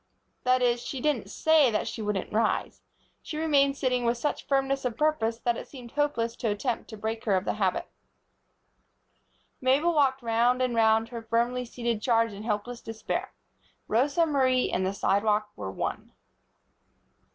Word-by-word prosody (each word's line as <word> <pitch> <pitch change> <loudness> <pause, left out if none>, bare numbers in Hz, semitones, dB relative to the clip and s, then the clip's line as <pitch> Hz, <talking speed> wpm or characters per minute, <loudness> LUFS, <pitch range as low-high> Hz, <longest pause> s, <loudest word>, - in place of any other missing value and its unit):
That 255 0 +3
is, 240 -1 +2
she 270 - -5
didn't 245 -8 0
say 315 +1 +4
that 215 - -1
she 225 - -5
wouldn't 210 -1 -2
rise. 220 0 0 0.4
She 305 - -6
remained 285 -3 +2
sitting 250 -2 0
with 235 0 +1
such 295 +5 -3
firmness 270 0 +1
of 240 -3 -2
purpose 265 -8 +1
that 235 0 -1
it - - -7
seemed 245 -4 -11
hopeless 235 -6 0
to 230 - -1
attempt 225 +3 -2
to 220 - -8
break 220 +1 -4
her 205 -4 +3
of 185 - 0
the - - 0
habit. 185 -2 0 1.7
Mabel 280 +7 +3
walked 270 -4 +2
round 235 +2 +2
and 255 -1 +1
round 225 0 +3
her 235 -1 -6
firmly 235 +2 0
seated 235 -2 -3
charge 230 -2 +2
in 200 - -8
helpless 225 +2 -3
despair. 225 0 -4 0.6
Rosa 280 +8 +2
Marie 260 -4 +2
and 185 - 0
the 190 - -2
sidewalk 210 +1 +1
were 95 - -5
one. 95 - -4
240 Hz, 165 wpm, -27 LUFS, 220-270 Hz, 1.7 s, say